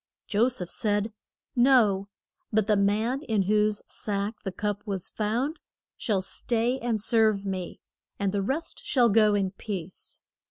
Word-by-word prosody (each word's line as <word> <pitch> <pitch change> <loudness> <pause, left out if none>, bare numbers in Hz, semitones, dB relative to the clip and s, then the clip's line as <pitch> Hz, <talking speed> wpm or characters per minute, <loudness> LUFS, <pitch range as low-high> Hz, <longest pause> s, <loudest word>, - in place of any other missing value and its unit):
Jo 220 +3 +3
seph 215 -9 -2
said, 210 -1 0 0.4
No; 235 -6 +4 0.4
but 215 -1 +2
the 215 0 +3
man 215 +7 +1
in 220 -9 0
whose 210 +1 +1
sack 205 0 -2
the 195 - -3
cup 205 +1 -2
was 195 -3 -2
found 240 +9 -2 0.3
shall 200 -4 -1
stay 235 +5 0
and 235 -3 -1
serve 215 -2 +2
me, 185 -2 -4 0.4
and 200 -1 0
the 200 0 0
rest 275 +11 -3
shall 245 -4 +3
go 215 -1 +4
in 195 -2 0
peace. 190 -3 -7
210 Hz, 150 wpm, -27 LUFS, 200-230 Hz, 0.4 s, No